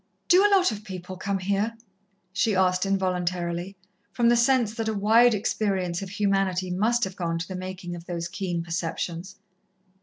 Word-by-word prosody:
"Do 370 +2 +7
a 415 - +5
lot 380 -7 +4
of 210 -1 -6
people 185 -2 -7
come 195 +1 -2
here?" 200 +4 -1 0.6
she 205 +2 +1
asked 185 0 +2
involuntarily, 180 -1 -1 0.4
from 235 -1 +2
the 240 - +5
sense 235 -2 +3
that 225 -1 -3
a 220 - -1
wide 225 +3 +5
experience 195 -4 -1
of 195 - -6
humanity 195 -2 0
must 230 +6 +1
have 190 -2 -2
gone 165 -2 -2
to 165 - -4
the 185 - -6
making 185 -1 -6
of 170 0 -11
those 170 -1 -3
keen 175 -1 -3
perceptions. 170 +2 -4
190 Hz, 175 wpm, -26 LUFS, 180-215 Hz, 0.6 s, Do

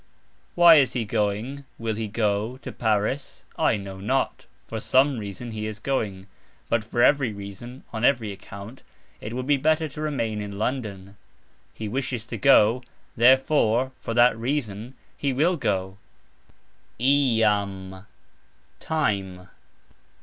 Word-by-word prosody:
"Why" 170 -2 +8
is 135 -3 +3
he 120 -3 -1
going 105 +7 -2
(will 115 -1 -2
he 110 0 -3
go) 105 +2 -1
to - - -6
Paris? 110 +5 -1
I - - +2
know 95 -1 -8
not; 130 +7 -1 0.2
"for 110 - -5
some 130 +3 +3
reason" 105 +3 -7
he 110 -1 -4
is 110 -1 -6
going, 105 -6 -2 0.4
but 115 -2 +1
"for 120 +2 0
every 140 -5 +4
reason" 100 +6 -9
(on 110 0 -4
every 120 -5 +2
account) 100 +4 -10 0.4
it 110 - -7
would 125 +1 -3
be 145 0 +3
better 155 +3 +2
to 145 +2 -8
remain 115 -8 -2
in 100 -1 -6
London. 105 -4 -4 0.6
He 110 - -5
wishes 125 0 -3
to - - -6
go, 125 -3 +5 0.3
"therefore" 130 0 +4
(for 115 - -4
that 120 -1 +5
reason) 120 -1 -3 0.2
he 140 -2 -1
will 165 +8 +2
go. 95 - -2 1.0
"iam", 105 -8 +1 0.7
time. 95 -11 -2
115 Hz, 135 wpm, -25 LUFS, 105-130 Hz, 1.0 s, Why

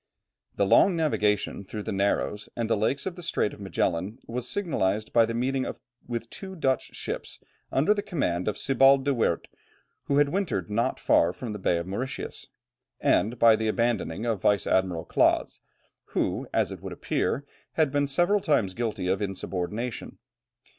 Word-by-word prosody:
The 100 - +2
long 180 - +5
navigation 105 -11 0
through 105 +2 -6
the 110 - -4
narrows 100 +1 0
and 115 -1 -1
the 115 - +2
lakes 110 +7 0
of 190 -2 -3
the 180 - -9
Strait 165 -10 0
of - - -12
Magellan 95 +2 -1
was 125 +1 -4
signalized 110 - -1
by 115 -1 +5
the 115 - -3
meeting 130 +2 0 0.4
with 115 -1 -4
two 190 -1 -8
Dutch 135 -6 -1
ships, - - -4 0.3
under 150 +10 +3
the 205 - -2
command 90 - -1
of 105 - -1
Sebald 135 0 +4
de 140 - +2
Weerdt, 115 -9 0 0.6
who 140 - +1
had 145 -1 +4
wintered 150 - -2
not 115 +3 0
far 85 - +4
from 115 0 -6
the 105 - -6
Bay 90 -2 +1
of 85 - -3
Mauritius, 115 +9 -5 0.5
and 110 +7 +2
by 115 -1 +7
the 110 0 -1
abandoning 115 -3 0
of 110 -5 -1
Vice 100 -1 +3
admiral 90 -3 +1
Claaz, - - +2 0.6
who, - - 0
as - - +1
it - - -8
would - - -6
appear, 140 +4 -1 0.3
had 155 -4 +2
been 145 0 +1
several 175 +9 +2
times 115 - +1
guilty 110 -4 -2
of 95 +2 +1
insubordination. 100 +4 -4
115 Hz, 175 wpm, -27 LUFS, 100-140 Hz, 0.6 s, by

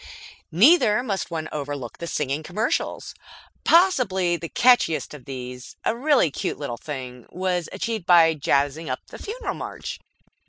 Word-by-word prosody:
Neither 245 - +5
must 200 -7 -3
one 160 -2 -4
overlook 145 -4 -5
the 170 - -5
singing 145 -1 -2
commercials. 210 +9 -2 0.5
Possibly 245 - +3
the 165 -1 -6
catchiest 245 -13 +3
of 140 -5 -11
these, 125 -1 -8
a - - +1
really 260 - +3
cute - - -3
little 140 -5 -4
thing, 125 -3 -7
was 180 -2 -2
achieved 225 -6 -3
by 165 -2 +6
jazzing 145 +1 0
up - - -4
the - - -10
Funeral 460 +5 -4
March. - - -6
170 Hz, 145 wpm, -24 LUFS, 145-225 Hz, 0.5 s, by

